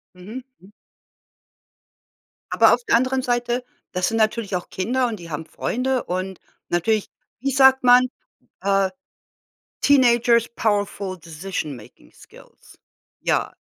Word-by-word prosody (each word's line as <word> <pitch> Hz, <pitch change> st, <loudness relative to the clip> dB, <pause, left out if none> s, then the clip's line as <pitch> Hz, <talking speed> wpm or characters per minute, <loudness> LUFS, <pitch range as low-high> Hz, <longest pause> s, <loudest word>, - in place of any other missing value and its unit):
Mhm. 215 Hz, +8 st, -9 dB, 0.2 s
Hm. 190 Hz, +3 st, -18 dB, 1.8 s
Aber -, -, +5 dB
auf -, -, -2 dB
der 420 Hz, -, +4 dB
anderen 260 Hz, +2 st, +1 dB
Seite, 245 Hz, 0 st, -1 dB, 0.3 s
das 180 Hz, 0 st, 0 dB
sind 225 Hz, -, -2 dB
natürlich 220 Hz, -2 st, 0 dB
auch 180 Hz, -, -6 dB
Kinder 245 Hz, +7 st, 0 dB
und 230 Hz, -, -3 dB
die 170 Hz, -, -10 dB
haben 160 Hz, +1 st, -5 dB
Freunde 255 Hz, +9 st, -2 dB
und 185 Hz, +1 st, -4 dB, 0.3 s
natürlich, 205 Hz, +5 st, 0 dB, 0.3 s
wie 275 Hz, +2 st, -1 dB
sagt 265 Hz, 0 st, +5 dB
man, 250 Hz, +1 st, +7 dB, 0.6 s
äh: 195 Hz, -1 st, +2 dB, 0.9 s
„Teenagers 240 Hz, -4 st, +4 dB
powerful 200 Hz, -3 st, -1 dB
decision 160 Hz, -2 st, -5 dB
making 105 Hz, -, -16 dB
skills.“ -, -, -18 dB, 0.4 s
Ja, -, -, 0 dB
220 Hz, 125 wpm, -22 LUFS, 185-250 Hz, 1.8 s, man